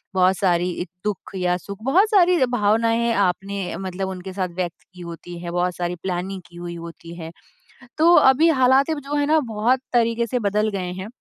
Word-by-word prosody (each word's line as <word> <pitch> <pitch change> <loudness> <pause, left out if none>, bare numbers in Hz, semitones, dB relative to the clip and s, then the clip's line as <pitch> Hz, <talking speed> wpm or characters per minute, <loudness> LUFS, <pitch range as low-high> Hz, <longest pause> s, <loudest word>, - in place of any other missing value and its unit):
बहुत 185 +1 +4
सारी 180 -2 0 0.2
दुःख 210 -2 -4
या 180 -1 +1
सुख, 200 +3 -9
बहुत 375 - +3
सारी 365 -4 +4
भावनाएँ 225 0 +2
है 235 0 +1
आपने 195 +1 -2
मतलब 190 0 -4
उनके 185 0 -7
साथ 185 -2 -2
व्यक्त 175 -2 -4
की 180 - -12
होती 170 0 -8
हैं, 175 0 -6
बहुत 180 0 0
सारी 175 0 -3
प्लानिंग 185 +1 -3
की 175 - -19
हुई 175 0 -6
होती 170 0 -10
है। 165 -1 -8 0.7
तो 335 +3 +5
अभी 270 +5 +5
हालाते 265 +5 +4
जो 285 +2 -4
है 290 0 +1
ना 315 +1 +4
बहुत 235 +5 +2
तरीके 235 0 +2
से 250 +3 -1
बदल 210 +2 +1
गए 180 -1 -4
हैं। 200 - -6
195 Hz, 195 wpm, -22 LUFS, 180-240 Hz, 0.7 s, तो